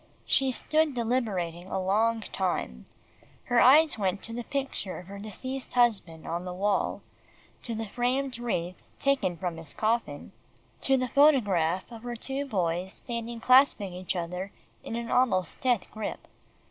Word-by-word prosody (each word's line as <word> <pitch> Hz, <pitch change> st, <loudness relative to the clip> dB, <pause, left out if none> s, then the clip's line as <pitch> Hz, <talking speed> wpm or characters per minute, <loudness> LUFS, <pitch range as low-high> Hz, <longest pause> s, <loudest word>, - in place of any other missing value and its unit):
She 270 Hz, -1 st, +2 dB
stood 310 Hz, +2 st, +1 dB
deliberating 205 Hz, -8 st, -1 dB
a 190 Hz, -, -2 dB
long 220 Hz, +4 st, +2 dB
time. 175 Hz, -, -3 dB, 0.6 s
Her 245 Hz, -1 st, +3 dB
eyes 295 Hz, -1 st, +6 dB
went 195 Hz, -1 st, -1 dB
to 230 Hz, -, -7 dB
the 240 Hz, +1 st, -4 dB
picture 270 Hz, -8 st, -3 dB
of 180 Hz, -, -9 dB
her 200 Hz, +2 st, -9 dB
deceased 255 Hz, +6 st, -6 dB
husband 210 Hz, -10 st, +2 dB
on 170 Hz, +1 st, -3 dB
the 180 Hz, 0 st, -5 dB
wall, 200 Hz, +2 st, 0 dB, 0.6 s
to 230 Hz, -, -4 dB
the 225 Hz, +1 st, -3 dB
framed 250 Hz, +3 st, -1 dB
wreath 180 Hz, -7 st, -3 dB, 0.2 s
taken 270 Hz, -11 st, +1 dB
from 175 Hz, -1 st, -3 dB
his 160 Hz, -3 st, -6 dB
coffin, 220 Hz, -10 st, -1 dB, 0.5 s
to 270 Hz, 0 st, +3 dB
the 255 Hz, 0 st, 0 dB
photograph 205 Hz, -, +3 dB
of 230 Hz, -1 st, -9 dB
her 240 Hz, 0 st, -5 dB
two 270 Hz, +4 st, -3 dB
boys 180 Hz, -4 st, -1 dB
standing 235 Hz, -1 st, -5 dB
clasping 250 Hz, -7 st, +5 dB
each 180 Hz, +1 st, -4 dB
other 180 Hz, +3 st, -4 dB, 0.3 s
in -, -, -5 dB
an 235 Hz, 0 st, -4 dB
almost 190 Hz, -9 st, +1 dB
death 245 Hz, -7 st, +2 dB
grip. 215 Hz, -1 st, -5 dB
220 Hz, 155 wpm, -28 LUFS, 185-250 Hz, 0.6 s, eyes